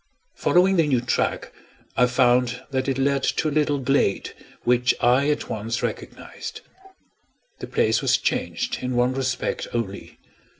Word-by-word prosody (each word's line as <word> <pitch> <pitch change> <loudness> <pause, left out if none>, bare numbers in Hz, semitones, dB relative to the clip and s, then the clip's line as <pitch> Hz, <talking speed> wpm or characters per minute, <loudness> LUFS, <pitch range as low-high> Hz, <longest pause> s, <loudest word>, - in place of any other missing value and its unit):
Following 185 +2 +3
the 165 -2 +3
new 130 -4 +2
track, 120 +1 -1 0.4
I 125 - +4
found 125 -1 +2
that 130 0 -1
it 135 -1 0
led 140 0 +1
to 155 - 0
a - - -5
little 145 -1 +1
glade 135 -6 0 0.3
which 125 0 +2
I 130 +4 +3
at 150 - -1
once 115 +2 -3
recognized. - - -6 1.0
The - - -6
place - - +1
was - - +3
changed 250 -1 -2
in 125 0 -2
one 125 +1 +2
respect 130 -1 -2
only. 100 -4 -4
130 Hz, 145 wpm, -23 LUFS, 125-140 Hz, 1.0 s, I